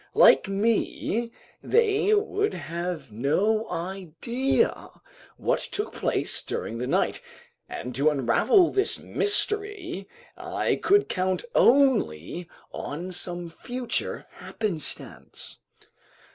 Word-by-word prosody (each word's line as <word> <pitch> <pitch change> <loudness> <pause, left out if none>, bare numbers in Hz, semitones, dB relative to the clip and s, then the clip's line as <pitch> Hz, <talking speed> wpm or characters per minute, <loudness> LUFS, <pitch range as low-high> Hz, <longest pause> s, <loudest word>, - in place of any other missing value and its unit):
Like - - +6
me, 225 +3 0 0.3
they 430 -3 +2
would 415 0 0
have 170 -4 -5
no 190 - +1
idea 190 - -1 0.5
what - - 0
took 420 - -4
place - - -1
during 115 - -4
the 125 - -3
night, - - +1 0.5
and 125 +1 -6
to 140 +5 +3
unravel 150 - +3
this 395 +1 +3
mystery 410 - -1 0.3
I - - -1
could 410 +1 +3
count 185 - -1
only 180 - +3 0.2
on 170 +6 -5
some 175 -1 -1
future 250 +6 -3
happenstance. 190 -9 -5
195 Hz, 95 wpm, -26 LUFS, -, 0.5 s, Like